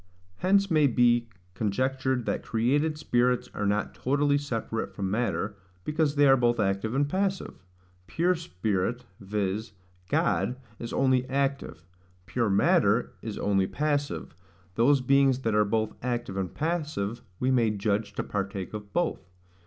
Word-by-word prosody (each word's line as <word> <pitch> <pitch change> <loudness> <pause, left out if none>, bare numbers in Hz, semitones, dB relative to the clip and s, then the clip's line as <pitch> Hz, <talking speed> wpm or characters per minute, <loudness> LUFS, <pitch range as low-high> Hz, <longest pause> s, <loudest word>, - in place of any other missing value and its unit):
Hence 195 +1 +2
may 155 -3 +5
be 120 -2 +3 0.2
conjectured 130 +5 -1
that - - -1
created 145 +7 +1
spirits 125 -3 +1
are 100 - -1
not 105 +1 0
totally 145 +2 +1
separate 115 -5 -4
from 95 -1 -2
matter, 105 -2 -1 0.3
because 150 - 0
they 145 0 +5
are 135 - +7
both 120 -2 +2
active 100 +3 0
and 140 +1 +2
passive. 190 - -2 0.4
Pure 175 +2 +2
spirit, 110 - -2
viz. 105 +1 -3 0.4
God, 125 - +1 0.2
is 115 - -6
only 130 -1 +2
active; 135 - -2 0.4
pure 115 +5 0
matter 100 0 +3
is - - -5
only 95 -2 +1
passive; 145 - -2 0.4
those 130 +7 +4
beings 135 0 +3
that 115 - +1
are 105 0 +4
both 110 +1 0
active 120 -5 -3
and 95 -2 -2
passive, 150 -10 -2 0.2
we 130 +1 +1
may 120 -4 +3
judge 100 0 -1
to - - -3
partake 100 -1 -4
of 105 -1 -7
both. 160 - -1
120 Hz, 145 wpm, -27 LUFS, 105-140 Hz, 0.4 s, are